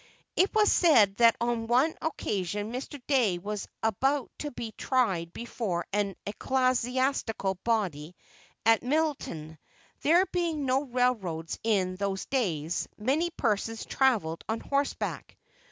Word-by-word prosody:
It 380 Hz, -, +4 dB
was 425 Hz, -1 st, +5 dB
said 220 Hz, -, +5 dB
that 230 Hz, -1 st, +6 dB
on 235 Hz, -1 st, -1 dB
one 255 Hz, +7 st, +3 dB
occasion 205 Hz, -, -2 dB
Mr. 275 Hz, +3 st, -5 dB
Dey 240 Hz, -11 st, +2 dB
was 205 Hz, +3 st, -5 dB, 0.2 s
about 265 Hz, +6 st, +1 dB
to 295 Hz, -, -3 dB
be 235 Hz, -4 st, -6 dB
tried 195 Hz, -11 st, 0 dB
before 205 Hz, -5 st, -3 dB
an 200 Hz, -2 st, 0 dB
ecclesiastical 250 Hz, -4 st, 0 dB
body 180 Hz, -8 st, -1 dB, 0.5 s
at 225 Hz, 0 st, +5 dB
Middletown. 250 Hz, -, -2 dB, 0.4 s
There 345 Hz, +5 st, +5 dB
being 335 Hz, -6 st, -1 dB
no 265 Hz, +2 st, +1 dB
railroads 225 Hz, -, -1 dB
in 190 Hz, -5 st, +1 dB
those 195 Hz, 0 st, -2 dB
days, 175 Hz, -, -1 dB
many 280 Hz, +10 st, +1 dB
persons 225 Hz, -6 st, -1 dB
travelled 215 Hz, -12 st, +1 dB
on 225 Hz, +1 st, 0 dB
horseback. 280 Hz, 0 st, -2 dB
230 Hz, 120 wpm, -28 LUFS, 195-270 Hz, 0.5 s, that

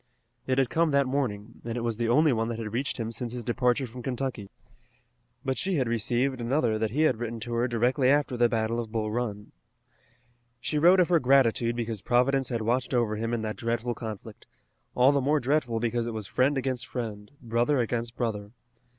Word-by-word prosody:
It 130 Hz, 0 st, +1 dB
had 135 Hz, -3 st, +2 dB
come 165 Hz, 0 st, +2 dB
that 140 Hz, -1 st, +3 dB
morning, 120 Hz, -5 st, -3 dB
and 115 Hz, 0 st, -4 dB
it -, -, -2 dB
was 115 Hz, -2 st, -1 dB
the 115 Hz, -1 st, 0 dB
only 150 Hz, +3 st, +4 dB
one 115 Hz, -1 st, 0 dB
that 115 Hz, -1 st, -3 dB
had 110 Hz, -2 st, -5 dB
reached 130 Hz, +4 st, -2 dB
him 115 Hz, 0 st, -3 dB
since 115 Hz, +1 st, -5 dB
his 125 Hz, -1 st, -4 dB
departure 125 Hz, +2 st, +1 dB
from 125 Hz, +1 st, -9 dB
Kentucky. 125 Hz, -5 st, -4 dB, 1.0 s
But 130 Hz, -1 st, -1 dB
she 190 Hz, -1 st, 0 dB
had 130 Hz, -5 st, +1 dB
received 120 Hz, +3 st, 0 dB
another 120 Hz, -3 st, +1 dB
that 110 Hz, 0 st, 0 dB
he 140 Hz, +8 st, -1 dB
had 130 Hz, -7 st, +3 dB
written 115 Hz, 0 st, -4 dB
to 120 Hz, +1 st, -5 dB
her 120 Hz, +1 st, +1 dB
directly 125 Hz, +3 st, +2 dB
after 145 Hz, -2 st, +2 dB
the 120 Hz, -1 st, +3 dB
Battle 115 Hz, 0 st, 0 dB
of 115 Hz, -2 st, -5 dB
Bull 110 Hz, -2 st, -2 dB
Run. 105 Hz, -3 st, -3 dB, 1.1 s
She 150 Hz, +6 st, -1 dB
wrote 180 Hz, +4 st, +6 dB
of 180 Hz, -, +3 dB
her 170 Hz, -2 st, +4 dB
gratitude 125 Hz, -3 st, +3 dB
because 115 Hz, -4 st, -3 dB
Providence 125 Hz, +4 st, +2 dB
had 115 Hz, -3 st, -2 dB
watched 125 Hz, +3 st, 0 dB
over 115 Hz, -3 st, +1 dB
him 115 Hz, +2 st, -2 dB
in 120 Hz, -1 st, -1 dB
that 110 Hz, -1 st, -4 dB
dreadful 120 Hz, +1 st, -1 dB
conflict, 110 Hz, -4 st, -8 dB, 0.5 s
all 125 Hz, +2 st, +5 dB
the 140 Hz, -1 st, +1 dB
more 145 Hz, +3 st, +2 dB
dreadful 130 Hz, -4 st, 0 dB
because 120 Hz, 0 st, -1 dB
it 115 Hz, -, -4 dB
was 110 Hz, -2 st, -5 dB
friend 130 Hz, +7 st, +1 dB
against 130 Hz, -2 st, -2 dB
friend, 105 Hz, -4 st, -5 dB
brother 120 Hz, +4 st, +1 dB
against 120 Hz, 0 st, -2 dB
brother. 105 Hz, -4 st, -3 dB
120 Hz, 210 wpm, -27 LUFS, 115-130 Hz, 1.1 s, wrote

